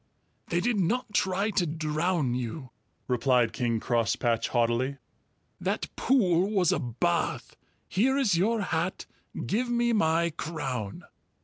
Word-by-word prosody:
"They 175 - 0
did 235 -1 +1
not 230 +5 0
try 195 +2 +1
to 180 -4 +1
drown 155 -2 0
you," 125 +2 -4 0.4
replied 125 -2 +2
King 115 -1 0
Crosspatch 115 0 +1
haughtily. 120 +3 0 0.6
"That - - -3
pool 195 -8 +3
was 190 -6 +2
a - - +1
bath. 120 -7 -1 0.3
Here 260 +8 +2
is 235 -10 +2
your 215 +6 +2
hat; 175 -1 -2 0.4
give 240 +5 0
me 240 0 +2
my 170 -4 +2
crown." 135 -10 -4
165 Hz, 125 wpm, -28 LUFS, 125-205 Hz, 0.6 s, pool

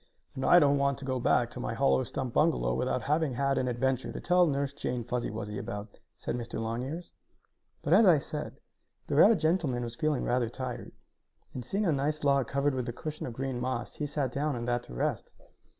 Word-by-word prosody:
"And 130 - -5
I 175 - +7
don't 145 -4 +5
want 140 -1 +1
to 140 - -8
go 130 -1 -1
back - - +2
to - - -7
my - - -3
hollow 65 -1 +3
stump - - -4
bungalow - - +2
without 65 - -1
having 150 -2 +1
had 135 +1 +1
an 125 - 0
adventure 130 +1 0
to - - -6
tell 180 0 +4
Nurse 140 -1 -1
Jane 125 -4 -3
Fuzzy 120 +1 -2
Wuzzy 105 -1 -5
about," 105 0 -7 0.2
said - - -4
Mr. 120 -2 -5
Longears. 125 +10 -4 0.7
But, 155 - +2
as 205 +2 +7
I 170 -4 +7
said, 150 +1 -5 0.5
the 145 - -2
rabbit 205 +9 +7
gentleman 155 -6 +1
was 120 0 -5
feeling 150 0 0
rather 120 -2 +1
tired, 125 -1 -6 0.6
and, 125 - -5
seeing 200 - -1
a 170 - +3
nice 150 +2 -1
log 140 -3 +3
covered 140 +1 +1
with 125 -2 -2
a - - -4
cushion 155 +3 -5
of 120 - -6
green 130 0 -3
moss, 130 -2 -3
he 150 - -2
sat 140 -3 -1
down 145 +2 -1
on 120 -1 -4
that 120 0 0
to - - -11
rest. - - -2
135 Hz, 215 wpm, -30 LUFS, 120-150 Hz, 0.7 s, I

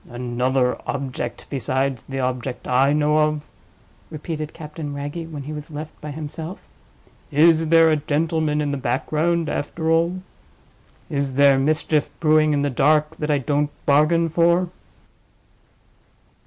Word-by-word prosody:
"Another 125 +1 0
object 130 -3 -4
besides 135 -1 -1
the 135 0 -3
object 125 0 -3
I 130 +3 +3
know 150 +1 +2
of?" 150 -1 0 0.6
repeated 155 0 -5
Captain 150 -2 -7
Wragge, 145 +4 -5
when 145 -3 -6
he 150 +3 -6
was 150 +1 -7
left 155 0 -8
by 150 - -6
himself. 155 +4 -6 0.7
"Is 160 +1 +4
there 165 0 +6
a 155 - +3
gentleman 155 0 0
in 145 -1 -1
the 140 - -2
background, 155 +6 0
after 160 +3 -2
all? 170 +3 +1 0.8
Is 140 -4 -2
there 140 -1 +5
mischief 155 +1 +1
brewing 155 -1 +4
in 145 -1 +1
the 145 - 0
dark 150 +4 +2
that 150 - -3
I 145 - +3
don't 145 +2 0 0.2
bargain 155 +4 +3
for?" 170 +2 +2
150 Hz, 140 wpm, -22 LUFS, 140-160 Hz, 0.8 s, there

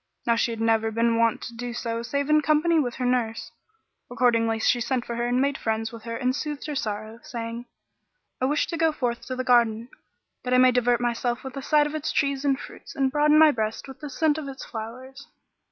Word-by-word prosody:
Now 235 - +3
she 230 - +1
had 230 -1 -5
never 225 0 +2
been 230 +1 +1
wont 230 -1 +2
so - - -6
to 230 - -14
do 235 -1 -4
save 280 +3 -2
in 305 0 +4
company 310 +2 +3
with 245 -5 -1
her 255 - -3
nurse; 240 -3 -1 0.6
accordingly 230 -2 +2
she 240 +2 +2
sent 245 0 -1
for 235 - -4
her 240 +1 -1
and 245 +1 +1
made 280 +1 0
friends 220 0 -2
with 230 -1 -11
her 230 0 -4
and 255 0 0
soothed 295 -1 -4
her 300 - -4
sorrow, 215 -3 -4
saying, 235 +1 -6 0.7
"I - - +3
wish 290 +2 +1
to 335 - -4
go 325 0 +3
forth 245 -5 -2
to 255 - -3
the 255 - -2
garden, 235 -2 +3 0.5
that 250 0 0
I - - +5
may 255 0 +6
divert 245 -1 +2
myself 240 +1 -1
with 265 -1 -7
the 275 - -5
sight 295 +2 +3
of 295 - -4
its 310 0 -2
trees 280 -2 0
and 275 -2 +1
Fruits, - - -11
and 270 -1 +1
broaden 300 +1 +4
my 310 -1 +7
breast 220 -2 -3
with 270 - -11
the 295 - -7
scent 310 +2 +1
of 295 - -6
its 270 -1 -8
flowers." 255 +5 -8
245 Hz, 235 wpm, -25 LUFS, 230-280 Hz, 0.7 s, my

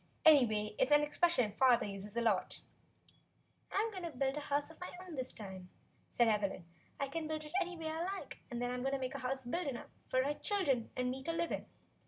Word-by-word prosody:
Anyway, 220 -9 +6
it's 260 - +3
an 295 0 +7
expression 295 -6 +2
father 255 -3 +6
uses 200 +2 -6
a - - +3
lot." 215 -5 +1 1.1
"I'm 435 +3 +1
going 380 -3 -6
to 340 - -3
build 270 -1 -1
a - - -1
house 290 +1 -1
of 320 - -16
my 360 - -4 0.2
own 355 - -8
this 260 -3 -1
time," 190 -3 -8 0.4
said 240 - +3
Evelyn. 200 -5 +1 0.3
"I 280 - 0
can 315 +3 -3
build 310 -1 -3
it 300 - -9
any 360 -1 -3
way 320 -1 -3
I 320 +1 -3
like, 390 +1 -5
then. 245 0 -2
I'm 250 0 -2
going 270 +2 0
to 275 - 0
make 255 -1 -3
a 275 - -4
house 265 0 -2
big 335 +7 -1
enough 250 -4 -5 0.2
for 255 0 +3
my 285 +2 +1
chil 405 +6 +1
dren 255 -7 +1
and 250 0 0
me 265 +1 -5
to 330 - -2
Hve 335 0 -1
in. - - -2
270 Hz, 235 wpm, -35 LUFS, 240-315 Hz, 1.1 s, an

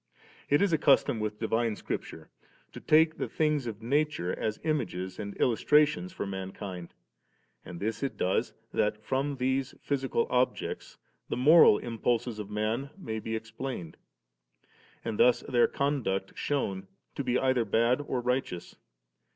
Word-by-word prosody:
It 145 +6 +4
is 195 -4 +2
a 160 - +3
custom 135 -4 +4
4 - - -4
with 105 0 -3
divine 115 0 0
Scripture - - -6 0.4
to - - -9
take 160 +1 +4
the - - -2
things 150 -5 0
of 110 -1 -6
nature 140 - 0
as 110 -1 -3
images 95 - -2
and 100 -1 -5
illustrations 150 +8 +3
for 185 - -4
mankind; 95 -2 -6 0.7
and 85 -1 -9
this 110 +2 -3
it 140 - -3
does, 95 - 0 0.2
that 105 0 0
from 140 +2 -1
these 130 0 -1
physical 135 -4 0
objects 125 0 -1 0.3
the - - -2
moral 145 -4 +7
impulses 115 0 -1
of 105 -1 -6
man 110 +6 -1
may 110 - -4
be 110 +1 -4
explained; 110 -5 -6 1.1
and 115 -2 -3
thus 125 - +5
their 120 -3 +3
conduct 115 -10 -1
shewn 100 -10 -2 0.3
to 140 - -3
be 125 -1 +1
either 130 -2 +2
bad 115 +5 +2
or 125 - -1
righteous. 125 -8 -2
120 Hz, 150 wpm, -29 LUFS, 105-140 Hz, 1.1 s, moral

